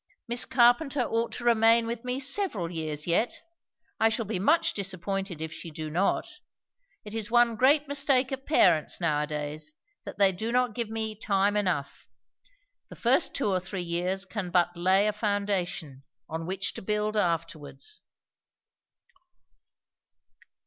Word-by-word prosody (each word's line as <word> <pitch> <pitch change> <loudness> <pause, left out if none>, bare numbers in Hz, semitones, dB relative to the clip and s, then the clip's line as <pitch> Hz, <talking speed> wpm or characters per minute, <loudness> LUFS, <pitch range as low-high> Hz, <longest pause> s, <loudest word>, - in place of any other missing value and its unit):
Miss 240 +1 +3
Carpenter 255 +3 +3
ought 230 0 -1
to - - -5
remain 230 0 +4
with 230 +1 -5
me 250 +1 -2
several 275 - -1
years 155 -3 -2
yet. 180 - 0 0.6
I 225 - +4
shall 225 0 -1
be 195 -2 -3
much 310 - +3
disappointed 195 -3 -3
if 160 -1 -6
she 155 +1 -7
do 155 0 -6
not. 180 +5 0 0.8
It 210 - -8
is 225 -1 -3
one 240 -1 +4
great 285 +5 +3
mistake 275 -2 +2
of 270 0 -4
parents 175 - +3
now 155 -4 +1
a 150 - -2
days, 150 - -5 0.3
that - - -8
they 200 -1 +5
do 220 +5 -4
not 250 -2 +1
give 235 -1 -2
me 220 -1 -3
time 205 -1 0
enough. 180 -9 -2 0.8
The - - -10
first - - +2
two 270 - 0
or 185 -1 +1
three 185 0 -5
years 180 +3 -1
can 190 -1 -5
but 175 -1 +2
lay 185 +3 +3
a 210 - +1
foundation, 200 - -2 0.3
on 165 +1 -5
which 190 +1 -3
to - - -8
build 210 +2 -1
afterwards." 170 - -3
205 Hz, 155 wpm, -27 LUFS, 175-235 Hz, 0.8 s, they